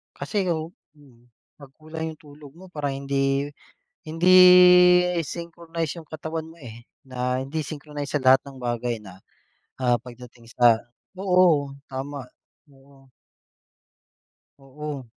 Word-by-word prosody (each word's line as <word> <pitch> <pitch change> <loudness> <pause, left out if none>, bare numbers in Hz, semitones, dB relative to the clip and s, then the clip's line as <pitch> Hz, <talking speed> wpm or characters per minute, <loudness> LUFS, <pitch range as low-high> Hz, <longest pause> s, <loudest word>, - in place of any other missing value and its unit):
Kasi 200 -4 -3
o, 160 0 -2 0.2
mm, 125 -5 -22 0.3
'pag 140 -2 -14
kulang 160 +1 -7
yung - - -37
tulog 145 0 -15
mo, 185 - -14
parang 145 -3 -3
hindi 140 +1 -1 0.6
hindi, 165 +3 -1 0.8
eh, 180 -1 -1
synchronize 170 -1 -6
yung 160 - -17
katawan 160 0 -6
mo, 165 - -15
eh, 120 -2 -11 0.2
na 125 0 -3
hindi 155 +4 -4
synchronize 145 -1 -7
sa - - 0
lahat 130 +1 +6
ng 135 -1 -12
bagay 120 -1 -3
na, 95 -1 -13 0.6
ah, 120 -1 +2
pagdating 120 0 -14
sa 120 -2 +5 0.4
oo. 180 -7 +2 0.2
Tama, 135 -1 -7 0.4
oo. 135 0 -22 1.5
Oo. 140 0 -8
140 Hz, 125 wpm, -24 LUFS, 130-160 Hz, 1.5 s, lahat